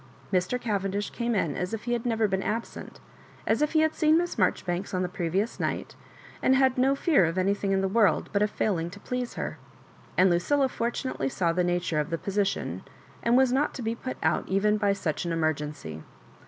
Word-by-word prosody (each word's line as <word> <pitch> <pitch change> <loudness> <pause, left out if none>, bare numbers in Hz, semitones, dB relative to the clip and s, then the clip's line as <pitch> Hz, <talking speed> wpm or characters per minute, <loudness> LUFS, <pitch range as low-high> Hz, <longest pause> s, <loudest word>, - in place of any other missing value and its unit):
Mr. 185 +7 +1
Cavendish 205 -3 -2
came 235 -1 -1
in 165 -7 0
as 180 +5 -2
if 220 - -9
he 240 - -1
had 240 +1 -1
never 225 -2 +2
been 190 -1 -1
absent, 225 +3 -4 0.5
as 225 +6 +1
if 300 +1 +1
he 315 - +4
had 315 0 +2
seen 310 0 +4
Miss 350 +1 -1
Marjoribanks 185 -1 0
on 185 - 0
the - - 0
previous 185 +4 -2
night, - - -3 0.5
and 265 - +4
had 260 -1 +4
no 265 +2 +3
fear 280 - +3
of 165 +3 -2
anything 195 +1 +1
in 195 0 +2
the 195 - +1
world 205 -2 +3
but 200 - +2
of 210 - +3
failing 175 -6 -1
to 200 +3 -11
please 250 +2 -4
her; - - -4 0.6
and 185 0 +5
Lucilla 265 +11 +2
fortu 240 +2 -2
nately 135 - -2
saw 170 +3 0
the 180 +1 +1
nature 175 -3 0
of 150 - -1
the 165 - -1
position, 195 +2 -1 0.4
and 235 +1 +3
was 260 -1 +4
not 275 +4 +1
to 255 - -5
be 225 +1 0
put 255 +2 -6
out - - +1
even 205 +2 +2
by 205 -1 +2
such 185 -6 -2
an 170 - -2
emergency. 150 - -2
200 Hz, 215 wpm, -27 LUFS, 180-240 Hz, 0.6 s, and